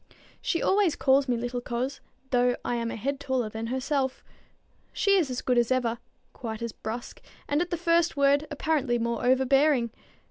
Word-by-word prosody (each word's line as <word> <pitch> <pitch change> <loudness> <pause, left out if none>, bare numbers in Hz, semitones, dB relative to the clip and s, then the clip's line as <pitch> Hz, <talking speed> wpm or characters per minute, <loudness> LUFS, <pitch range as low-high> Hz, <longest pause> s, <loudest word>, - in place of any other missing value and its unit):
She 335 - -1
always 390 -5 +3
calls 270 +1 +3
me 245 -2 +1
little 245 +1 -3
coz, 250 +3 -3 0.3
though 245 -1 +3
I - - 0
am 230 -1 -2
a - - -4
head 275 +5 -2
taller 260 -5 -1
than 220 +1 -5
herself. 260 +1 -1 0.7
She 400 -1 +2
is 340 -8 +2
as 250 0 -4
good 250 -1 +3
as 235 +1 +1
ever, 240 -2 +1 0.3
quite 225 -2 -6
as 235 - -3
brusque, 225 +3 -7 0.3
and 290 +2 +1
at 350 - -2
the 345 - -1
first 335 -1 +2
word 280 +2 +3
apparently 290 -4 0
more 235 0 -2
overbearing. 265 -1 +3
260 Hz, 180 wpm, -27 LUFS, 240-285 Hz, 0.7 s, always